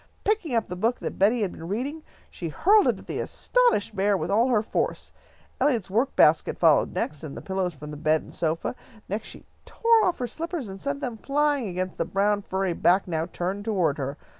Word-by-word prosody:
Picking 400 - 0
up 225 - +1
the 180 - -5
book 225 +7 0
that - - -6
Betty 220 +5 +4
had 190 - -1
been 165 - -9
reading, 265 - -3 0.3
she 170 - -5
hurled 405 - +4
it - - +2
at - - -13
the - - -4
astonished 480 - +1
bear 200 +1 +2
with 165 +1 -3
all 225 +5 +4
her 225 -5 +2
force. - - -2 0.5
Eliot's 230 -10 +1
work 235 +7 +1
basket - - +4
followed - - +4
next, 150 0 -3
and 150 -3 -7
the - - -4
pillows 190 -3 -2
from 150 +1 -9
the 150 - -7
bed 155 +1 +1
and - - -14
sofa. 165 0 -1 0.3
Next 210 +3 -3
she - - -10 0.2
tore 460 -2 +3
off 360 - +1
her 250 - -2
slippers, 320 - -4
and 190 0 -9
sent 140 0 -3
them 235 -2 -4
flying 285 0 +1
against 185 0 -4
the - - +1
brown 205 +3 +1
furry 190 -2 -1
back 180 +3 +3
now 165 -1 -1
turned 185 +3 -3
toward 180 -9 0
her. 140 +2 -3
200 Hz, 215 wpm, -26 LUFS, 175-250 Hz, 0.5 s, Betty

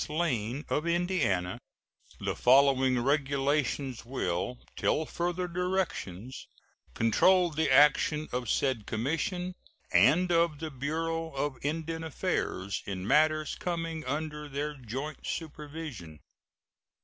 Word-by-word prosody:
Lane, 145 -5 -1
of 155 +3 -1
Indiana, 170 - 0 0.6
the - - -2
following 130 0 +5
regulations 140 -2 0
will 110 -3 -2 0.2
till 155 - +1
further 175 +3 -2
directions 170 - -3 0.5
control 175 - +4
the 155 0 0
action 150 +2 +5
of 125 -2 -2
said 130 -6 0
commission 165 - -2 0.4
and 175 +7 +5
of 165 -2 +3
the 160 +1 -5
Bureau 165 +4 -2
of 135 -1 -3
Indian 160 +2 -2
Affairs 100 - -2
in 95 -1 -4
matters 155 +2 +3
coming 165 -2 -3
under 150 +2 -3
their 145 +2 -3
joint 135 +3 -6
supervision: 150 - -6
1. 75 - -18
150 Hz, 110 wpm, -30 LUFS, 130-165 Hz, 0.6 s, following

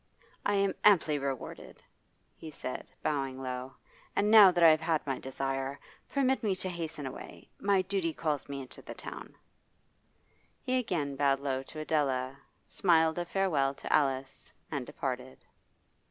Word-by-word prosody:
'I 205 - +2
am 195 0 +2
amply 155 -7 +5
rewarded,' 135 -2 -6 0.5
he 160 - -9
said, 130 -4 -6
bowing 135 -3 -1
low. 130 0 -5 0.4
'And 210 +1 +2
now 215 -3 +10
that 175 -1 +2
I 165 - +10
have 155 0 +4
had 165 -1 0
my 135 -2 -2
desire, 135 +1 -3 0.3
permit 265 -1 +1
me 205 -5 +1
to 185 0 -2
hasten 165 -4 -5
away. 130 - -9
My 200 -2 +2
duty 185 -3 -1
calls 150 -3 -2
me 140 -1 -4
into 130 - -11
the - - -9
town.' - - -9 1.3
He 255 -1 +1
again 155 - -2
bowed 135 -1 +2
low 135 -2 -1
to 135 - -12
Adela, 135 -4 0 0.3
smiled 160 -2 +3
a 175 - -2
farewell 155 -8 +1
to - - -3
Alice, 135 -2 0 0.2
and 140 -5 -3
departed. 130 -1 -5
150 Hz, 155 wpm, -31 LUFS, 135-180 Hz, 1.3 s, now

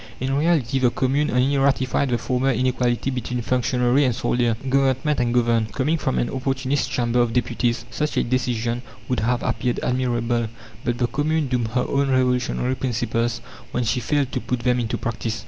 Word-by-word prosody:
In 135 +1 -1
reality, 145 -4 +2
the 125 -2 +4
Commune 135 +5 0
only 130 +3 +2
ratified 135 0 +1
the 120 - +1
former 130 +2 0
inequality 125 +1 0
between 125 -1 -3
functionary 125 +3 +2
and 125 -4 +1
soldier, 120 -2 +1
Government 135 +2 +2
and 120 -1 +1
governed. 115 -2 +1
Coming 150 +5 0
from 130 - -1
an 120 - +1
Opportunist 135 +1 -1
Chamber 120 0 0
of 120 -2 0
Deputies, 120 -1 0
such 150 +5 -2
a - - +3
decision 120 -1 -1 0.3
would 125 -3 0
have 120 +3 0
appeared 125 -1 -1
admirable, 120 -2 0 0.4
but 120 0 -1
the 120 - +1
Commune 150 +4 0
doomed 125 -3 0
her 125 - +2
own 140 0 +1
revolutionary 125 -1 +1
principles 120 -2 -1 0.3
when 125 - -1
she 115 +2 0
failed 140 +1 0
to 130 - -2
put 125 -2 -2
them 125 0 +2
into 115 -2 -1
practice. 115 -1 -3
125 Hz, 180 wpm, -23 LUFS, 120-135 Hz, 0.4 s, the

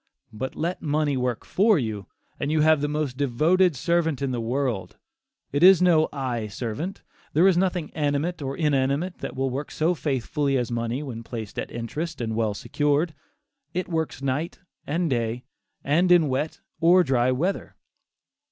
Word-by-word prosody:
But 130 +5 -5
let 170 +3 -2
money 150 -2 0
work 125 -2 -2
for 210 +1 +3
you, 110 -7 -3 0.3
and 145 - -1
you 155 -1 +2
have 155 -1 +4
the 145 - +1
most 150 -3 -2
devoted 155 +6 +3
servant 160 +2 +1
in 140 -2 -1
the 120 -2 -2
world. 120 -3 -2 0.5
It 145 - 0
is 185 0 +8
no 170 -3 +4
"eye 125 -6 -3
servant." 120 - -5 0.3
There 170 +6 +5
is 190 - +4
nothing 180 -3 0
animate 150 +3 -1
or 135 0 -4
inanimate 150 +3 0
that - - -6
will 135 0 -1
work 140 +3 -4
so 160 +3 +1
faithfully 140 -1 -1
as 120 -1 -2
money 120 +4 -2
when 120 -5 -6
placed 115 -3 -6
at - - -4
interest, 145 +8 -5
well 110 -2 -1
secured. 145 +7 0 0.6
It 185 - -1
works 160 -5 -2
night 140 +5 -2 0.3
and 170 +4 0
day, 120 -2 -1 0.4
and 170 +6 +2
in 170 -4 +5
wet 135 +4 -2 0.2
or 180 +2 +6
dry 130 -3 +2
weather. 170 +10 -2
145 Hz, 165 wpm, -25 LUFS, 125-165 Hz, 0.6 s, is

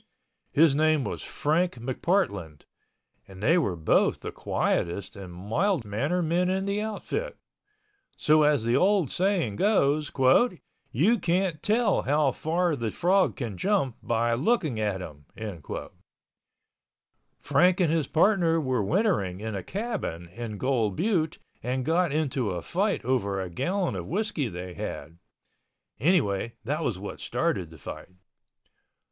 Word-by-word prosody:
His 155 -1 +5
name 155 0 +3
was 105 - -4
Frank 170 +5 0
McPartland—and 100 - -4
they 165 +9 +4
were 100 - -1
both 80 -2 +2
the - - -5
quietest 90 +3 -1
and 95 -3 -9
mild 115 - -1
mannered 145 - -1
men 175 +3 +1
in 190 +1 0
the 200 +1 -1
outfit. 220 - -4 0.8
So 155 +1 +4
as 150 -5 +3
the 115 +1 +1
old 195 -6 +3
saying 180 - 0
goes: 155 -8 +2 0.8
"You 205 - +3
can't 175 -2 0
tell 215 -1 +2
how 145 0 +2
far 165 +4 0
the 115 -4 -2
frog 185 - +2
can 115 -8 -5
jump 185 - +1
by 120 0 +1
looking 155 - +1
at 105 -3 -1
him." 75 -4 -10 2.1
Frank 175 +6 +3
and 170 -4 +3
his 160 -4 +1
partner 170 -1 +3
were 130 -6 0
wintering 105 - +1
in 110 +1 -4
a 95 - -3
cabin 195 - -4
in 110 +2 -6
Gold 115 -5 0
Butte 170 - 0 0.2
and 125 +2 -2
got 170 +1 +2
into 140 -6 0
a 90 -2 -4
fight 200 - -1
over 100 -7 0
a 95 -2 -4
gallon 180 - -1
of 90 -2 -5
whiskey 180 - -1
they 90 -2 -7
had—anyway 100 - -3
that - - -2
was - - -1
what - - -7
started 90 -4 -1
the 80 - -13
fight. 70 - -8
145 Hz, 135 wpm, -27 LUFS, -, 2.1 s, His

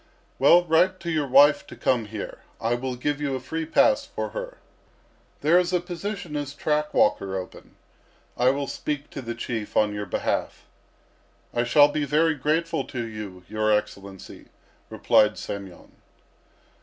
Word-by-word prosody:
"Well, 170 +6 +6
write 180 +3 +3
to 170 0 -3
your 155 -3 0
wife 140 +3 +5
to - - -10
come 120 -4 0
here. 105 0 -7 0.2
I 115 +1 0
will 125 +1 -3
give 145 +4 -2
you 140 -2 -1
a - - -3
free 160 +5 -5
pass - - +3
for - - -5
her. - - -7 0.8
There 170 +4 +5
is 180 0 0
a 180 - +3
position 175 -1 -6
as 145 -1 -4
track 150 +1 -1
walker 95 -2 +1
open. 90 -1 -9 0.6
I 125 +1 +3
will 140 +1 0
speak 145 +1 -4
to - - -6
the 115 -1 -5
Chief 115 -2 -4
on 105 -1 +3
your 105 0 -5
behalf." - - -2 0.9
"I 120 0 0
shall 145 +4 +6
be 145 0 -2
very 155 +3 +2
grateful 155 +1 -1
to 120 -3 -5
you, 105 -5 -8
your 110 0 0
Excellency," 100 -2 -4 0.4
replied 105 0 +3
Semyon. 100 -3 -8
140 Hz, 160 wpm, -25 LUFS, 110-160 Hz, 0.9 s, Well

